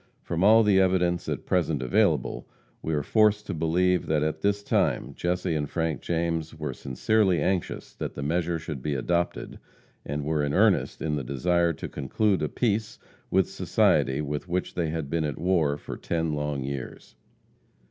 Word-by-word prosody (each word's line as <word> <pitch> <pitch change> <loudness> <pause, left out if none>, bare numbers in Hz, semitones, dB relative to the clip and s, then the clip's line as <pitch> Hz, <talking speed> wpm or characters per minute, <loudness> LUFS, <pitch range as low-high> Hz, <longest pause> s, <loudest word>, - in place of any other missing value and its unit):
From 85 +1 -1
all 110 +3 +7
the 100 -2 +4
evidence 90 -2 +1
at - - -3
present 80 -7 0
available, 65 - +1 0.3
we 80 - -1
are 75 - 0
forced 105 +3 +3
to 100 - -4
believe 90 +3 +1
that 75 -1 +1
at 80 0 -2
this 100 +2 +1
time - - 0
Jesse 90 -1 -1
and 75 -2 -2
Frank 80 -5 -2
James 85 -1 -2
were 75 -4 -4
sincerely 90 - +1
anxious 90 +3 -2
that - - -5
the 70 - -4
measure 85 +3 0
should 75 -4 -6
be 75 +1 -2
adopted, 85 +6 -2 0.4
and 75 0 -4
were 75 -1 0
in 70 0 -1
earnest - - +2
in 75 -2 0
the 70 - -3
desire 85 +7 +1
to - - -6
conclude 95 +8 0
a 75 - -1
peace 110 -2 -1 0.3
with - - +3
society 65 +2 +2
with 75 +2 -4
which 90 +1 -2
they 85 -3 -1
had 80 -2 -3
been 80 +2 -1
at 75 -3 -3
war 85 -5 +1
for - - -7
ten 80 -2 -2
long 75 -2 -2
years. 70 -1 -6
80 Hz, 180 wpm, -26 LUFS, 75-90 Hz, 0.4 s, all